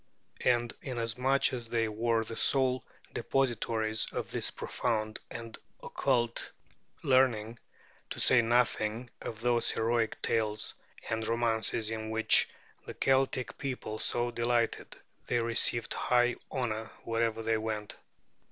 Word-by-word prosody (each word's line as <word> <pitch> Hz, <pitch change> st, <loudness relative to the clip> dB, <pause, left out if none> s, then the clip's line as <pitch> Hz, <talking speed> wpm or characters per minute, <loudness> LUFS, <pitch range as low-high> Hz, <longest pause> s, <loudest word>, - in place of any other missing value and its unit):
And 120 Hz, -1 st, +2 dB
inasmuch 125 Hz, +2 st, +1 dB
as 120 Hz, -3 st, -5 dB
they 115 Hz, -1 st, +1 dB
were 115 Hz, +1 st, +1 dB
the 115 Hz, +1 st, -7 dB
sole 130 Hz, -1 st, +2 dB, 0.3 s
depositories 115 Hz, -4 st, 0 dB
of -, -, -4 dB
this -, -, -1 dB
profound 110 Hz, -3 st, -2 dB
and 115 Hz, -1 st, -7 dB, 0.3 s
occult 120 Hz, -4 st, 0 dB, 0.5 s
learning, 120 Hz, -4 st, +2 dB, 0.5 s
to -, -, -5 dB
say 125 Hz, -, +6 dB
nothing 115 Hz, 0 st, +1 dB
of 110 Hz, -1 st, -6 dB
those 120 Hz, -1 st, +2 dB
heroic 115 Hz, 0 st, 0 dB
tales 110 Hz, -2 st, 0 dB, 0.3 s
and 110 Hz, 0 st, -2 dB
romances 115 Hz, -1 st, +1 dB
in 110 Hz, -1 st, -4 dB
which 110 Hz, 0 st, +4 dB, 0.4 s
the -, -, -6 dB
Celtic 135 Hz, -1 st, +1 dB
people 125 Hz, -5 st, -4 dB
so 120 Hz, 0 st, +1 dB
delighted, 120 Hz, -1 st, 0 dB, 0.3 s
they 120 Hz, -, +1 dB
received 115 Hz, 0 st, +2 dB
high 120 Hz, 0 st, +2 dB
honor 110 Hz, -5 st, -2 dB
wherever 115 Hz, -1 st, 0 dB
they 110 Hz, 0 st, +2 dB
went. 110 Hz, -1 st, -4 dB
115 Hz, 120 wpm, -31 LUFS, 110-120 Hz, 0.5 s, say